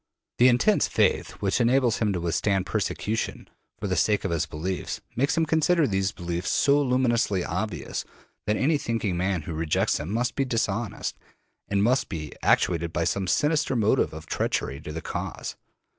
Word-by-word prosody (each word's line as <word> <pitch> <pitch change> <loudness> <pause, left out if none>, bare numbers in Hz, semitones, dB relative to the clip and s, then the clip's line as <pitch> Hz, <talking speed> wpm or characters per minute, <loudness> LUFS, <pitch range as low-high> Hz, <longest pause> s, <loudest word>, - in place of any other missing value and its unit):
The 125 - +7
intense 130 - +4
faith - - +2
which 100 +5 +2
enables 120 -1 +3
him 105 -2 +1
to 90 - -1
withstand 95 +3 0
persecution 110 +6 -2 0.3
for - - -5
the - - 0
sake 105 -1 +2
of - - -1
his 80 -1 0
beliefs 90 +5 -4 0.2
makes 140 +4 +1
him 165 - +3
consider 160 +1 +3
these 95 -4 0
beliefs 85 0 -3
so 145 +1 +3
luminously 120 -7 +1
obvious 95 +1 -3 0.4
that 105 0 +2
any 150 +2 +2
thinking 115 -7 -1
man 90 -2 0
who 85 - -5
rejects 80 -1 +1
them 80 +6 -5
must 120 +2 0
be 135 - 0
dishonest, 115 -4 -2 0.5
and 100 0 +1
must 125 +4 +2
be 75 -5 -5
actuated 85 -1 +2
by 85 - 0
some 95 +2 -1
sinister 150 - +1
motive 110 -2 +2
of - - -9
treachery 70 +3 -2
to 75 - -7
the 80 +1 -5
cause. - - -5
105 Hz, 175 wpm, -26 LUFS, 90-125 Hz, 0.5 s, The